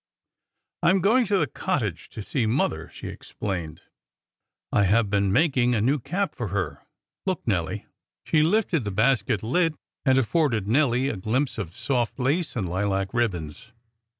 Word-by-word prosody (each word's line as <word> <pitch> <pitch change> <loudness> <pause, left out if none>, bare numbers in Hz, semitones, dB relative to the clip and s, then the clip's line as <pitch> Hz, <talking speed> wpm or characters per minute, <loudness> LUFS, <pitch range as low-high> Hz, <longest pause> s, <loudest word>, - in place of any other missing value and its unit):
"I 170 - +4
am 190 +2 +4
going 230 +5 +3
to 200 0 +2
the 160 - +2
cottage 125 - -2
to 110 - -7
see 115 +1 -1
mother," 80 - 0
she - - -10
explained. 85 -6 -5 0.9
"I 100 - +3
have 105 +1 +2
been 100 -1 +2
making 125 - +3
a - - +1
new 135 +6 +2
cap 180 +10 -2
for 120 -5 -4
her, 95 -5 -3 0.5
look, - - -2
Nelly." - - -1 0.4
She 155 - +2
lifted 170 - +2
the 105 - -3
basket 110 0 +1
lid, 165 +7 +1 0.3
and 130 -2 +4
afforded 130 - +1
Nelly 130 +1 +2
a 110 - -3
glimpse 125 +7 -1
of 85 -4 -5
soft 120 -2 -1
lace 145 +6 0
and 105 -7 -1
lilac 95 +2 -1
ribbons. 105 -3 -2
120 Hz, 160 wpm, -25 LUFS, 100-145 Hz, 0.9 s, I